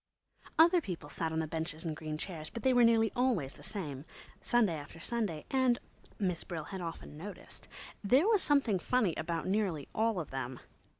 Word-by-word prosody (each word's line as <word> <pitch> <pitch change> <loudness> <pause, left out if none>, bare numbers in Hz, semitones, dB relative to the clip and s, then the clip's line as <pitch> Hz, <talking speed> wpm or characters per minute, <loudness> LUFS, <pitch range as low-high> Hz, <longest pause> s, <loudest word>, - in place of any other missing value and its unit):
Other 340 +2 +7
people 170 - -6
sat 160 +2 -2
on 160 - -2
the 160 - +1
benches 160 +1 -3
and 160 -2 -2
green 155 -1 -4
chairs, 160 -2 -5
but 230 - -7
they 260 - +4
were 245 -1 +6
nearly 225 -1 +5
always 235 - +1
the - - -12
same, 145 -10 -4 0.4
Sunday 230 -7 +3
after 150 +1 -8
Sunday, 200 -5 -1
and—Miss 240 -8 -1
Brill 170 -4 -5
had 190 +4 -6
often 165 -3 -6
noticed—there 205 - -2
was 435 -4 +4
something 270 -10 +3
funny 220 -4 +2
about 165 +1 -2
nearly 190 -7 0
all 220 -3 +1
of 160 - -5
them. 130 -1 -4
185 Hz, 175 wpm, -33 LUFS, 160-235 Hz, 0.4 s, Other